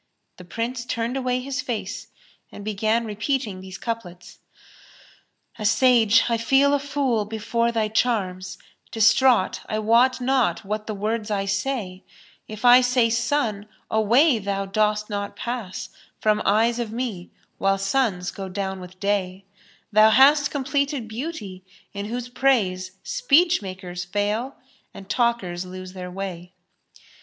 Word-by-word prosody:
the 180 Hz, -, -11 dB
Prince 230 Hz, +7 st, -4 dB
turned 235 Hz, +1 st, -3 dB
away 255 Hz, -1 st, 0 dB
his 260 Hz, 0 st, -3 dB
face 230 Hz, -3 st, -5 dB, 0.4 s
and 205 Hz, -, -10 dB
began 215 Hz, +2 st, 0 dB
repeating 215 Hz, -2 st, -2 dB
these 190 Hz, 0 st, -9 dB
couplets, 185 Hz, -7 st, -6 dB, 1.2 s
"A -, -, -4 dB
Sage, 230 Hz, +1 st, +4 dB
I 235 Hz, -1 st, +1 dB
feel 270 Hz, +5 st, +3 dB
a 285 Hz, -, +3 dB
fool 275 Hz, -5 st, 0 dB
before 225 Hz, +2 st, -1 dB
thy 225 Hz, -2 st, 0 dB
charms; 195 Hz, -5 st, -1 dB, 0.2 s
* -, -, -35 dB
Distraught, 225 Hz, -1 st, +3 dB
I 215 Hz, -, -1 dB
wot 235 Hz, +5 st, +3 dB
not 250 Hz, -4 st, +1 dB
what 210 Hz, +1 st, -4 dB
the 215 Hz, -, -3 dB
words 215 Hz, +2 st, -2 dB
I 200 Hz, -2 st, -1 dB
say: 200 Hz, -2 st, -3 dB, 0.4 s
If 215 Hz, -1 st, -8 dB, 0.2 s
say 250 Hz, -1 st, +3 dB
I -, -, +1 dB
'Sun,' 230 Hz, -3 st, -1 dB, 0.2 s
away 235 Hz, +5 st, +4 dB
thou 195 Hz, -1 st, -2 dB
dost 210 Hz, +1 st, 0 dB
not 205 Hz, -1 st, -4 dB
pass 235 Hz, -6 st, -5 dB, 0.2 s
* -, -, -35 dB
From 215 Hz, -1 st, +3 dB
eyes 225 Hz, +4 st, +2 dB
of 230 Hz, -3 st, -3 dB
me, 225 Hz, -7 st, -4 dB, 0.3 s
while 195 Hz, 0 st, +2 dB
suns 195 Hz, -3 st, 0 dB
go 195 Hz, -1 st, -7 dB
down 190 Hz, 0 st, -4 dB
with 180 Hz, 0 st, -12 dB
day: 195 Hz, -1 st, -1 dB, 0.5 s
Thou 215 Hz, +1 st, +6 dB
hast 285 Hz, +5 st, +5 dB
completed 280 Hz, -2 st, -1 dB
Beauty, 220 Hz, -, -6 dB, 0.3 s
in 200 Hz, 0 st, -5 dB
whose 240 Hz, +2 st, -4 dB
praise 215 Hz, -8 st, +1 dB
* -, -, -46 dB
Speech 355 Hz, -, +3 dB
makers 185 Hz, -2 st, -6 dB
fail, 210 Hz, +8 st, -2 dB, 0.4 s
and 195 Hz, -, -10 dB
talkers 210 Hz, -6 st, 0 dB
lose 185 Hz, 0 st, -9 dB
their 180 Hz, -1 st, -7 dB
way." 180 Hz, -1 st, -7 dB
215 Hz, 145 wpm, -23 LUFS, 195-245 Hz, 1.2 s, Thou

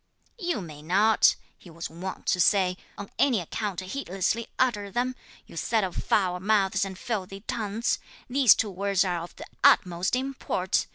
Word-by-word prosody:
'You 350 Hz, -, -1 dB
may 155 Hz, -4 st, -9 dB
not' 200 Hz, +7 st, +4 dB, 0.2 s
(he 180 Hz, -, -15 dB
was 165 Hz, 0 st, -6 dB
wont 185 Hz, +3 st, -7 dB
to 180 Hz, -, +1 dB
say), 185 Hz, 0 st, +3 dB, 0.2 s
'on 200 Hz, -, -8 dB
any 255 Hz, -6 st, +4 dB
account 190 Hz, +2 st, -4 dB
heedlessly 195 Hz, +1 st, -2 dB
utter 210 Hz, -6 st, +1 dB
them, 245 Hz, +5 st, -1 dB, 0.3 s
you -, -, -14 dB
set 220 Hz, -3 st, +1 dB
of 185 Hz, -2 st, -3 dB
foul 180 Hz, -3 st, +1 dB
mouths 195 Hz, 0 st, +2 dB
and 190 Hz, -1 st, -5 dB
filthy 195 Hz, -5 st, -4 dB
tongues! 220 Hz, +1 st, -2 dB, 0.3 s
these 260 Hz, -2 st, +6 dB
two 210 Hz, -, -1 dB
words 195 Hz, +1 st, +1 dB
are 175 Hz, -2 st, -1 dB
of 170 Hz, -, -9 dB
the -, -, -9 dB, 0.2 s
utmost 180 Hz, +4 st, +4 dB
import! 255 Hz, -8 st, -1 dB
195 Hz, 165 wpm, -27 LUFS, 180-225 Hz, 0.3 s, these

